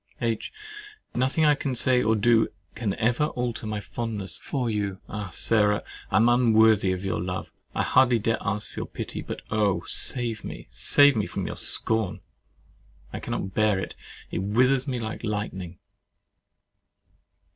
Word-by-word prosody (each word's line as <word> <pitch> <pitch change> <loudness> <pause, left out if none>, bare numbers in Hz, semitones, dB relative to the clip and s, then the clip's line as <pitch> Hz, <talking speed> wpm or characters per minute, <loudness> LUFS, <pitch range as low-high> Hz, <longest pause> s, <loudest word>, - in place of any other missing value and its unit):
H. 115 -3 -2 0.6
Nothing 130 +6 +1
I 150 - +6
can 140 -2 -2
say 125 +1 +4
or 110 -1 +2
do 110 +1 +4 0.3
can 110 -4 -2
ever 120 +6 +1
alter 120 -5 -3
my 105 -1 -2
fondness 105 -4 -3
for 130 -4 -3
you—Ah, 100 -1 -3
Sarah! 105 0 +2 0.3
I - - -1
am 115 +2 +5
unworthy 110 -5 +4
of 95 +1 -3
your 95 - -1
love: 90 +1 -4 0.2
I - - +1
hardly 125 -2 +4
dare 115 +1 0
ask 105 0 -1
for - - -7
your - - -4
pity; - - -6
but - - -7
oh! 105 -3 +1
save 120 -3 0
me—save 145 - +3
me 105 -3 0
from - - -4
your - - -4
scorn: 110 -4 +1 0.9
I - - -4
cannot 95 - -4
bear 110 -1 +2
it—it 95 - -7
withers 125 +7 +2
me 125 -2 -2
like 110 0 -5
lightning. 95 -5 -4
110 Hz, 150 wpm, -26 LUFS, 105-120 Hz, 0.9 s, I